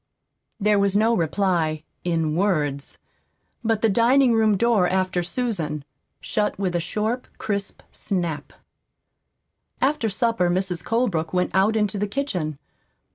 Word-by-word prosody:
There 210 0 +3
was 200 0 +3
no 225 +2 +3
reply 165 -3 0 0.2
in 165 -3 0
words. 150 -7 0 0.7
But 225 -1 0
the - - +6
dining 240 +4 +4
room 220 -2 +3
door 215 -4 +3
after 185 -1 0
Susan 175 - -2 0.3
shut 210 -1 -1
with 185 -3 -1
a - - +2
short, 215 +8 -2
crisp 200 -2 -4
snap. 175 -6 -3 1.3
After 265 -4 +1
supper 205 -3 +1
Mrs. 180 -1 0
Colebrook 195 -9 0
went 180 0 +1
out 195 +3 +3
into 210 -2 0
the 210 - 0
kitchen. 190 - -2
195 Hz, 130 wpm, -23 LUFS, 175-220 Hz, 1.3 s, the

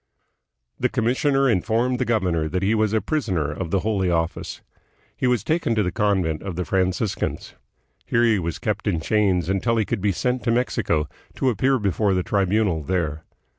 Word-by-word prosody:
The - - +1
commissioner 135 +4 +1
informed 120 +4 +1
the 130 - +1
governor 90 -9 0
that 90 +3 -2
he 100 +3 +2
was 110 -2 +1
a 110 -1 +1
prisoner 95 - -1
of 85 +3 -5
the 95 +2 +1
Holy 100 -4 0
Office. 85 0 -2 0.5
He 130 - 0
was 125 -2 +1
taken 160 -8 0
to 105 - +2
the 90 - -1
convent 95 -7 0
of 95 -3 -5
the 90 0 -2
Franciscans. 95 +2 -1 0.5
Here 115 - +2
he 115 -4 +3
was 85 -2 -3
kept 105 -3 -3
in 90 -5 +1
chains 95 -2 +1
until 100 +5 +1
he 110 - +2
could 115 -2 -2
be 100 0 +2
sent 125 +6 -1
to 115 - +2
Mexico, 85 -10 0 0.3
to 130 - +1
appear 130 +5 +2
before 100 -2 +1
the 90 - 0
Tribunal 100 -3 +1
there. 80 -2 -2
100 Hz, 185 wpm, -23 LUFS, 90-115 Hz, 0.5 s, he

